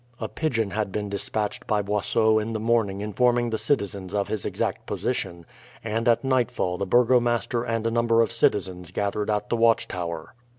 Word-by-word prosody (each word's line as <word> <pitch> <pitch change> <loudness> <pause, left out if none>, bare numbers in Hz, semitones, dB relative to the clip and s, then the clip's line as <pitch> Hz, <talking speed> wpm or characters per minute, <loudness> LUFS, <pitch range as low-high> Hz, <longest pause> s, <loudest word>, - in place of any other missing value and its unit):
A - - -3
pigeon 115 -10 -1
had 105 -2 -2
been 105 +1 -3
despatched 105 +1 -2
by 105 -1 +1
Boisot 110 +2 +2
in 115 +2 -4
the 110 - -2
morning 110 -3 +1
informing 120 +3 +1
the 110 - -1
citizens 100 -7 -1
of 100 -1 0
his 110 -3 -2
exact - - -3
position, 85 -1 -3 0.4
and 115 +2 -1
at 115 +2 +3
nightfall 125 -9 0
the 100 - -2
burgomaster 120 +1 +3
and 115 -2 -2
a 115 - +1
number 115 0 +3
of 115 - -3
citizens 95 -6 0
gathered 105 +1 -2
at 105 -1 -1
the 120 - +1
watchtower. 90 -8 0
110 Hz, 175 wpm, -25 LUFS, 100-115 Hz, 0.4 s, at